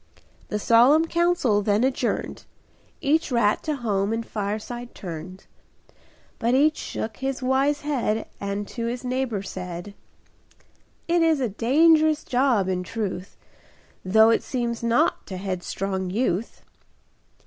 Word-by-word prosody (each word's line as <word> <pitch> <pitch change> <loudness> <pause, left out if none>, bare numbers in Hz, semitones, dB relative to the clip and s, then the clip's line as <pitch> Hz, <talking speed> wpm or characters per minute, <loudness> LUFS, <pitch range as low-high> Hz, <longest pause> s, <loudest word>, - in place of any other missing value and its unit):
The 210 - -2
solemn 245 +9 +5
council 340 -11 +2
then 205 +2 +1
adjourned. 260 0 -1 0.6
Each 310 +1 +1
rat 225 -4 +2
to 305 - -2
home 205 -5 -1
and 225 0 -2
fireside 220 +4 -5
turned; 180 +1 -8 0.9
But 235 +2 +2
each 305 +3 +3
shook 220 -1 -5
his 270 -1 -3
wise 275 +3 +1
head 245 -7 -1
And 200 0 -3
to 230 -2 -4
his 245 +2 -4
neighbor 250 -5 -2
said: 180 0 -7 1.1
"It 340 0 +2
is 325 -3 +3
a 250 -3 0
dangerous 310 +8 +3
job, 245 -6 +2
in 185 -1 -1
truth, 195 -1 -5 0.7
Though 220 +4 +5
it - - +2
seems 235 -3 -3
naught 235 0 +1
to 190 - -6
headstrong 190 0 -3
youth." 215 0 -2
230 Hz, 125 wpm, -24 LUFS, 200-265 Hz, 1.1 s, solemn